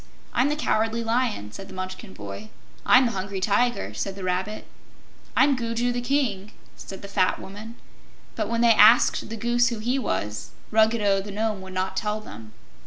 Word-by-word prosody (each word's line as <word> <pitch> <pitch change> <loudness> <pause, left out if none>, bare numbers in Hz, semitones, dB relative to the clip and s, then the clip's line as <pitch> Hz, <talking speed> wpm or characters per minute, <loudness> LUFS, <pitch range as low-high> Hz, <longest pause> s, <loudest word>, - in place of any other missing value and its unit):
"I'm 255 +4 +2
the 295 - 0
Cowardly 225 -5 0
Lion," 225 - -1
said 195 - -9
the - - -11
Munchkin 185 +2 -7
boy. 100 +1 -8 0.4
"I'm 255 +1 +7
the 235 - 0
Hungry 195 0 -4
Tiger," 235 +5 +1
said 195 -1 -4
the 195 - -8
Rabbit. 185 +4 -2 0.7
"I'm 280 -1 +5
Gugu 235 0 -1
the 245 0 -2
King," 240 -7 -1 0.2
said 195 - -10
the - - -6
fat 195 -2 +1
Woman. 215 +4 -9 0.6
But - - -2
when 230 0 0
they 235 -1 +6
asked 220 +3 +5
the 225 - -5
Goose 240 +2 +2
who 235 -1 -2
he 245 +5 -1
was, 105 - -3 0.2
Ruggedo 220 -3 +3
the 205 - -9
Nome 210 0 -2
would 190 0 -9
not 185 +1 -2
tell 210 +2 -1
them. 110 - -11
215 Hz, 180 wpm, -25 LUFS, 190-235 Hz, 0.7 s, I'm